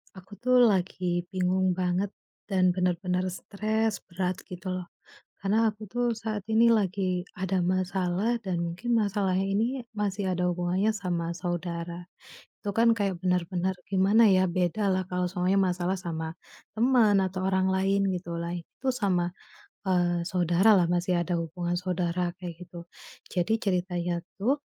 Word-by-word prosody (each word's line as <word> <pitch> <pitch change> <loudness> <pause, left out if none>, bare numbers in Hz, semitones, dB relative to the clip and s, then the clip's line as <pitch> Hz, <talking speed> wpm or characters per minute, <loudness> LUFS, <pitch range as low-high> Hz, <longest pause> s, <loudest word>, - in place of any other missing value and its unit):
Aku 190 +2 -13
tuh 250 0 +5
lagi 180 -4 +1
bingung 185 0 +1
banget 185 +2 0 0.4
dan 185 -2 +3
bener-bener 180 0 0
stres 215 +3 -1
berat 180 0 -2
gitu 185 +1 -6
loh. 185 -1 -4 0.5
Karena 220 +4 +2
aku 215 0 -9
tuh 245 +3 -1
saat 215 -3 -4
ini 230 +1 +5
lagi 190 -4 +1 0.2
ada 190 0 0
masalah 185 +4 0
dan 185 -4 -2
mungkin 180 +8 -1
masalahnya 195 -3 +1
ini 200 +3 +1 0.3
masih 200 -2 -1
ada 180 0 0
hubungannya 180 +4 +1
sama 175 -4 -2
saudara. 175 0 -4 0.5
Itu 205 - -2
kan 230 +1 +5
kayak 195 -4 -1
benar-benar 180 0 0
gimana 200 +4 +5
ya, 185 0 +4
bedalah 185 +2 +1
kalau 180 0 0
soalnya 185 +1 +1
masalah 185 0 0
sama 160 -2 -5 0.4
teman 230 -4 +4
atau 185 0 -2
orang 190 0 +2
lain 195 +1 +2
gitulah 170 -1 -4
itu 175 +9 -8
sama, 180 -6 0 0.6
eee, 175 -1 +2
saudaralah, 180 +2 +4
masih 175 0 +1
ada 175 +1 -2
hubungan 175 +2 -3
saudara 180 -1 -1
kayak 175 -2 -7
gitu. 170 0 -10 0.5
Jadi 195 +5 +1
ceritanya 180 -2 -1 0.2
tuh, 265 +8 +1
185 Hz, 140 wpm, -28 LUFS, 175-200 Hz, 0.6 s, tuh